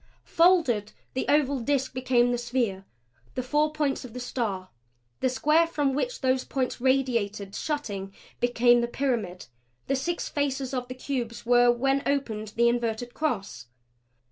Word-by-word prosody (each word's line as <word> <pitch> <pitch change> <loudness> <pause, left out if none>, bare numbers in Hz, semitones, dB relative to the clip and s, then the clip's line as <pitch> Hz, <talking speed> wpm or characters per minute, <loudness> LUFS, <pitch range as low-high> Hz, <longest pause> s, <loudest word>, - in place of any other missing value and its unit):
Folded, 330 - +3 0.2
the 260 - -2
oval 285 -2 +3
disk 270 +2 0
became 250 -1 +2
the 245 - 0
sphere; 235 -6 -1 0.5
the 255 - -2
four 300 +4 +1
points 295 -3 -1
of 245 -3 -10
the 250 - -6
star, 215 -7 -3 0.5
the 260 - +2
square 305 +6 +3
from 290 -4 0
which 485 - -2
those 260 -1 +2
points 255 -2 -2
radiated; 235 -7 0
shutting 205 -12 -3 0.3
became 240 0 +4
the 235 - 0
pyramid; 235 -9 -2 0.4
the 275 - 0
six 340 +6 -2
faces 275 -2 -2
of 250 -1 -2
the 255 - -7
cubes 245 -4 -4
were 245 0 +5
when 270 +3 +1
opened 220 -7 -2
the 235 +1 +4
inverted 240 0 -1
cross. 195 - -3
250 Hz, 150 wpm, -27 LUFS, 235-275 Hz, 0.5 s, were